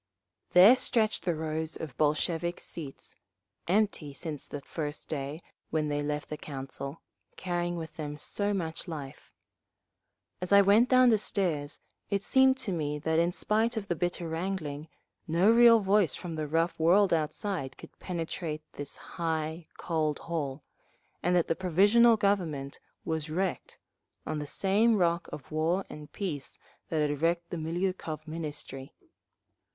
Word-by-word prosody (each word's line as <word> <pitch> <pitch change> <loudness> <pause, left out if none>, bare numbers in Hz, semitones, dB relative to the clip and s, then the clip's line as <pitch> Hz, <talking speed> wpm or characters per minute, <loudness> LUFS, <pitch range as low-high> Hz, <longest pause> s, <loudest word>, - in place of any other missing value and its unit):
There 190 +7 +9
stretched 220 -7 +1
the 175 -3 +1
rows 160 0 -3
of 150 -6 -7
Bolshevik 165 +3 0
seats—empty 170 +3 -4
since 155 -3 -4
that 145 -1 -7
first 150 -2 -4
day 145 +2 -4 0.3
when 155 -1 0
they 145 0 -1
left 150 0 -3
the 150 - -4
Council, 140 +1 -6 0.3
carrying 175 -1 -2
with 160 -1 -7
them 150 -2 -5
so 205 +6 -1
much 170 -3 -3
life. 145 -5 -8 1.1
As 180 - -3
I 200 0 +8
went 210 +5 +5
down 255 -1 +6
the 220 -2 +4
stairs 160 -8 -1 0.3
it 200 -1 0
seemed 265 0 +5
to 240 -7 -3
me 150 -4 -1
that 160 +2 +1
in 170 +1 +2
spite 220 +5 0
of 205 -2 -4
the 175 - +1
bitter 175 +1 -2
wrangling, 160 -3 -3 0.4
no 170 +6 +4
real 230 -1 +7
voice 195 -5 +3
from 175 -3 -6
the 155 -1 -3
rough 165 +3 0
world 180 +4 +5
outside 155 -3 -2
could - - -14
penetrate 165 -3 -4
this 145 -1 -5
high, 160 0 -3
cold 155 -3 -1
hall, 145 -4 -4 0.6
and 180 +1 +2
that 175 - +3
the - - +2
Provisional 205 +7 +5
Government 170 -10 -1 0.3
was 160 -1 -2
wrecked—on 165 -2 -5
the 150 - -5
same 210 +7 +3
rock 170 -2 +1
of 140 - -9
War 165 +5 +1
and 150 0 -10
Peace 155 -9 -5 0.3
that 155 -2 +1
had 145 0 -3
wrecked 170 +1 0
the 175 - -3
Miliukov 165 -1 -3
Ministry…. 150 -4 -6
165 Hz, 145 wpm, -29 LUFS, 150-190 Hz, 1.1 s, There